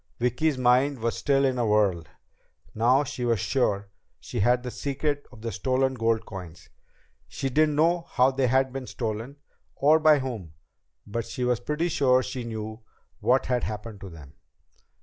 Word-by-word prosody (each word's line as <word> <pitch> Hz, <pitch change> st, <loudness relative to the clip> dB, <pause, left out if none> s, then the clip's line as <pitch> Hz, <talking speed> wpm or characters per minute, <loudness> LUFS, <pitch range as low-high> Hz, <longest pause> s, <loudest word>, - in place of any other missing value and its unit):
Vicki's 125 Hz, +5 st, 0 dB
mind 130 Hz, +3 st, +3 dB
was 115 Hz, 0 st, -2 dB
still 140 Hz, -1 st, +2 dB
in 130 Hz, -2 st, 0 dB
a 120 Hz, -, +1 dB
whirl. 100 Hz, -5 st, +2 dB, 0.7 s
Now 125 Hz, +5 st, +3 dB
she 130 Hz, -3 st, -5 dB
was 115 Hz, -3 st, +1 dB
sure 100 Hz, -5 st, 0 dB, 0.3 s
she -, -, -5 dB
had 120 Hz, +4 st, +3 dB
the 125 Hz, -, -5 dB
secret 145 Hz, +2 st, -2 dB
of 115 Hz, -3 st, -14 dB
the 115 Hz, -, -3 dB
stolen 130 Hz, +6 st, 0 dB
gold 115 Hz, -2 st, 0 dB
coins! 90 Hz, -4 st, -10 dB, 0.6 s
She 135 Hz, -, -3 dB
didn't 150 Hz, +2 st, +2 dB
know 170 Hz, +3 st, +2 dB
how 130 Hz, +1 st, +3 dB
they 130 Hz, -1 st, +1 dB
had 130 Hz, +1 st, +2 dB
been 135 Hz, -2 st, -5 dB
stolen, 115 Hz, +3 st, -4 dB, 0.4 s
or 155 Hz, +3 st, +4 dB
by 155 Hz, -1 st, +6 dB
whom. 115 Hz, -, -5 dB, 0.5 s
But 115 Hz, +3 st, -4 dB
she 125 Hz, -, -4 dB
was 125 Hz, -2 st, +1 dB
pretty 150 Hz, +7 st, -1 dB
sure 130 Hz, -4 st, +3 dB
she 125 Hz, 0 st, -5 dB
knew 110 Hz, -1 st, -6 dB, 0.4 s
what 125 Hz, +4 st, +2 dB
had 125 Hz, -1 st, 0 dB
happened 105 Hz, -1 st, -6 dB
to 95 Hz, -, -8 dB
them. 75 Hz, -5 st, -13 dB
125 Hz, 170 wpm, -26 LUFS, 110-135 Hz, 0.7 s, by